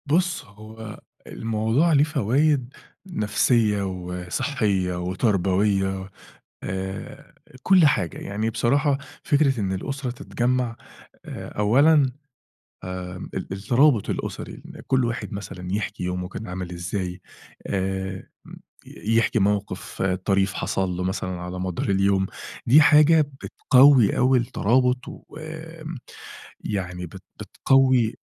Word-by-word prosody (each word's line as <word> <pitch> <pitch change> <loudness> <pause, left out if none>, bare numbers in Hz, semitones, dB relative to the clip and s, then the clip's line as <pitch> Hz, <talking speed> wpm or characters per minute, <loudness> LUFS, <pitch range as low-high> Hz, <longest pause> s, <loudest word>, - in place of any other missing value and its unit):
بُص، 175 +4 +1
هو 110 +1 -11 0.3
الموضوع 115 +9 +1
ليه 145 -1 +5
فوايد 140 -1 +1 0.3
نفسية 105 - +1
وصحية 90 +2 -2
وتربوية، 95 0 0 0.5
آآ، 95 +1 -6 0.3
كل 185 -4 +6
حاجة. 90 - 0
يعني 105 +3 -2
بصراحة 135 +5 +1 0.2
فكرة 140 -4 +2
إن 95 -2 -1
الأسرة 135 +7 -3
تتجمع، 125 0 -1 0.5
أولًا 135 +6 +2 0.9
آآ، 90 0 -7 0.2
ال 95 0 -5
الترابط 120 +4 +2
الأسري، - - -5
إن - - -11
كل 130 -1 +2
واحد 115 0 -3
مثلًا 95 -3 -7
يحكي 105 0 -3
يومه 90 0 -3
كان 110 +3 -7
عامل 90 -1 -5
إزاي، 90 +1 -4 0.5
آآ، 95 -1 -3 0.2
م - - -12 0.3
يحكي 115 +1 0
موقف 100 0 -1
طريف 95 +1 +1
حصل 95 -1 -1
له 90 0 -3
مثلًا 95 -1 -3
على 90 +1 -6
مدار 90 0 -3
اليوم. 95 0 +2 0.4
دي 140 +6 +7
حاجة 155 +1 +6 0.2
بتقوي 130 -4 +5
أوي 130 +1 +4
الترابط 125 +1 +1 0.3
ويعني 155 - -7
بت 95 +3 -12 0.2
بتقوي 130 -4 +2
105 Hz, 105 wpm, -24 LUFS, 95-130 Hz, 0.9 s, دي